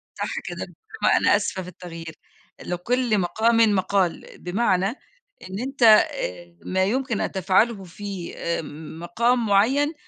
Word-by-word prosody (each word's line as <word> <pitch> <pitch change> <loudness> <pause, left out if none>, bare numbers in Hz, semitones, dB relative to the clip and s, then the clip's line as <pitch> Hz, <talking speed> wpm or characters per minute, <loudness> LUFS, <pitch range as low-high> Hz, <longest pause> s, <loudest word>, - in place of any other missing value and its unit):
صح - - -3
كده، - - -5 0.4
ما - - +5
أنا - - +4
آسفة 190 - -2
في 180 - -10
التغيير 165 -2 -9 0.5
لكل 225 +5 0
مقامٍ 220 +6 +2 0.2
مقال، 190 -2 0
بمعنى 190 0 +1 0.6
إن 190 - -5
أنت 245 -5 +5 0.6
ما 190 0 +1
يمكن 250 +1 -1
أن - - -2
تفعله 195 +3 +2
في 190 0 -7 0.7
مقام 235 +7 +1
معين 260 +10 +3
200 Hz, 120 wpm, -24 LUFS, 180-235 Hz, 0.7 s, ما